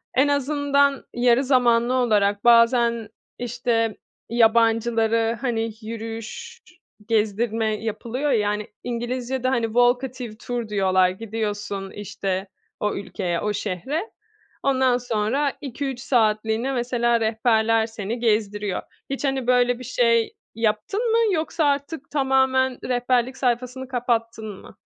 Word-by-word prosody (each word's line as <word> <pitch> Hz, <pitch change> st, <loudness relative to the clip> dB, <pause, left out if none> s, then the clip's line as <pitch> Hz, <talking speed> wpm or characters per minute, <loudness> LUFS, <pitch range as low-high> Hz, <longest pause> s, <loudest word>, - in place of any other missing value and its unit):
en 270 Hz, +3 st, +4 dB
azından 285 Hz, 0 st, +1 dB
yarı 245 Hz, +2 st, +3 dB
zamanlı 245 Hz, -2 st, +3 dB
olarak 205 Hz, -5 st, +2 dB
bazen, 235 Hz, -1 st, +4 dB, 0.3 s
işte, 235 Hz, -2 st, -1 dB, 0.3 s
yabancıları, 230 Hz, 0 st, +3 dB
hani, 230 Hz, -3 st, -1 dB
yürüyüş, 230 Hz, -, -7 dB, 0.5 s
gezdirme 220 Hz, 0 st, +1 dB
yapılıyor 240 Hz, +6 st, -2 dB
ya, 210 Hz, -4 st, +2 dB
hani, 210 Hz, 0 st, -3 dB, 0.2 s
İngilizcede, 245 Hz, +1 st, -2 dB
hani, 235 Hz, -3 st, +1 dB
walkative 245 Hz, 0 st, 0 dB
tour 240 Hz, 0 st, -4 dB
diyorlar. 185 Hz, -3 st, +3 dB
Gidiyorsun, 205 Hz, -1 st, -4 dB
işte, 195 Hz, -1 st, -4 dB, 0.3 s
o 210 Hz, -, -1 dB
ülkeye, 180 Hz, -3 st, -3 dB
o 210 Hz, -, -1 dB
şehre. 260 Hz, -, -3 dB, 0.5 s
Ondan 260 Hz, -2 st, +3 dB
sonra 245 Hz, +4 st, 0 dB
2-3 270 Hz, -1 st, -4 dB
saatliğine 225 Hz, 0 st, +1 dB
mesela 240 Hz, -1 st, +1 dB
rehberler 225 Hz, 0 st, +2 dB
seni 225 Hz, +1 st, -5 dB
gezdiriyor. 210 Hz, -3 st, 0 dB, 0.3 s
Hiç, 275 Hz, -, -4 dB
hani, 270 Hz, -2 st, -1 dB
böyle, 245 Hz, -1 st, +3 dB
bir 255 Hz, -, -8 dB
şey 230 Hz, -2 st, +2 dB, 0.2 s
yaptın 230 Hz, -, 0 dB
mı? 455 Hz, -, +4 dB, 0.2 s
Yoksa 315 Hz, 0 st, -1 dB
artık 285 Hz, +1 st, -1 dB
tamamen 265 Hz, -2 st, +2 dB
rehberlik 250 Hz, 0 st, 0 dB
sayfasını 250 Hz, +1 st, -1 dB
kapattın 230 Hz, -4 st, -2 dB
mı? -, -, -15 dB
235 Hz, 115 wpm, -23 LUFS, 220-255 Hz, 0.5 s, en